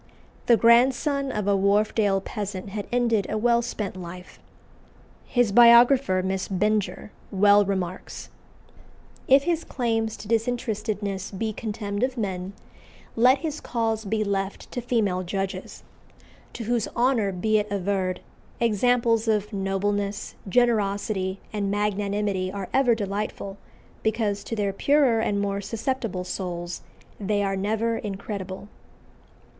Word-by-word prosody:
The 235 Hz, -, +6 dB
grandson 265 Hz, +4 st, +3 dB
of 210 Hz, -4 st, -2 dB
a 200 Hz, -, +4 dB
Wharfdale 200 Hz, 0 st, +2 dB
peasant 200 Hz, -1 st, -5 dB
had 205 Hz, 0 st, -5 dB
ended 230 Hz, -5 st, +1 dB
a 215 Hz, -, -1 dB
well 235 Hz, +2 st, +3 dB
spent 210 Hz, -5 st, -4 dB
life. 180 Hz, 0 st, -9 dB, 0.9 s
His 245 Hz, -4 st, +2 dB
biographer, 235 Hz, -2 st, +6 dB
Miss 190 Hz, 0 st, -2 dB
Benger, 210 Hz, +2 st, -1 dB, 0.2 s
well 205 Hz, +1 st, +5 dB
remarks: 190 Hz, -2 st, -4 dB, 1.0 s
"If 270 Hz, +1 st, +6 dB
his 335 Hz, 0 st, 0 dB
claims 225 Hz, -3 st, -1 dB
to 205 Hz, -, -10 dB
disinterestedness 215 Hz, -4 st, -2 dB
be 215 Hz, +2 st, -3 dB
contemned 205 Hz, -1 st, -4 dB
of 255 Hz, 0 st, 0 dB
men, 190 Hz, -3 st, -3 dB, 0.6 s
let 250 Hz, +4 st, +5 dB
his 310 Hz, -2 st, -4 dB
cause 225 Hz, -2 st, -1 dB
be 215 Hz, +1 st, -1 dB
(left) 195 Hz, -1 st, -3 dB
to 245 Hz, -, -3 dB
female 220 Hz, -6 st, 0 dB
judges, 195 Hz, +1 st, -4 dB, 0.7 s
to 230 Hz, -, -6 dB
whose 235 Hz, 0 st, 0 dB
honour 235 Hz, -5 st, +2 dB
be 215 Hz, +4 st, +1 dB
it 210 Hz, 0 st, -3 dB
averred, 190 Hz, -2 st, -1 dB, 0.4 s
examples 235 Hz, 0 st, +2 dB
of 210 Hz, -1 st, 0 dB
nobleness, 200 Hz, +1 st, -2 dB, 0.2 s
generosity 200 Hz, -4 st, +1 dB
and 205 Hz, -2 st, -1 dB
magnanimity 205 Hz, -2 st, -1 dB
are 195 Hz, -1 st, -5 dB
ever 255 Hz, -3 st, +4 dB
delightful, 200 Hz, -1 st, -4 dB, 0.5 s
because 215 Hz, -2 st, 0 dB
to 230 Hz, -, -3 dB
their 200 Hz, -2 st, -1 dB
purer 275 Hz, 0 st, +3 dB
and 205 Hz, -2 st, 0 dB
more 200 Hz, 0 st, -1 dB
susceptible 225 Hz, -3 st, -3 dB
souls 175 Hz, -1 st, -5 dB, 0.4 s
they 205 Hz, 0 st, 0 dB
are 195 Hz, 0 st, 0 dB
(never) 220 Hz, +4 st, -1 dB
incredible." 195 Hz, -1 st, -6 dB
210 Hz, 125 wpm, -25 LUFS, 195-230 Hz, 1.0 s, The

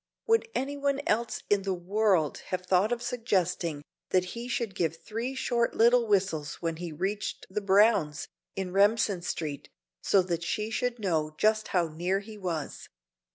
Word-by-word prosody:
Would 455 Hz, 0 st, +3 dB
any 280 Hz, +3 st, -2 dB
one 280 Hz, 0 st, 0 dB
else 230 Hz, +2 st, 0 dB
in 205 Hz, -1 st, +3 dB
the 190 Hz, -1 st, -1 dB
world 185 Hz, -3 st, +1 dB
have 180 Hz, 0 st, -3 dB
thought 190 Hz, +4 st, +3 dB
of 240 Hz, 0 st, -1 dB
suggesting 180 Hz, -10 st, -1 dB, 0.3 s
that 185 Hz, -1 st, +3 dB
he 235 Hz, +1 st, -6 dB
should 235 Hz, -4 st, -2 dB
give 170 Hz, -4 st, 0 dB
three 230 Hz, +8 st, -4 dB
short 240 Hz, -2 st, 0 dB
little 235 Hz, +1 st, +5 dB
whistles 185 Hz, -8 st, +1 dB
when 165 Hz, -1 st, -3 dB
he 175 Hz, -1 st, -5 dB
reached 195 Hz, +7 st, -3 dB
the 210 Hz, -, -1 dB
Browns', 195 Hz, -6 st, +3 dB, 0.3 s
in 190 Hz, -2 st, -3 dB
Remsen 205 Hz, -1 st, +3 dB
Street, 155 Hz, -4 st, -4 dB, 0.3 s
so 195 Hz, -2 st, +4 dB
that 170 Hz, -2 st, -2 dB
she 210 Hz, +5 st, -2 dB
should 245 Hz, +1 st, -1 dB
know 160 Hz, -7 st, -1 dB
just 215 Hz, 0 st, +2 dB
how 175 Hz, -3 st, +1 dB
near 175 Hz, +5 st, -1 dB
he 215 Hz, +2 st, -10 dB
was? 175 Hz, -7 st, -4 dB
195 Hz, 165 wpm, -29 LUFS, 175-230 Hz, 0.3 s, little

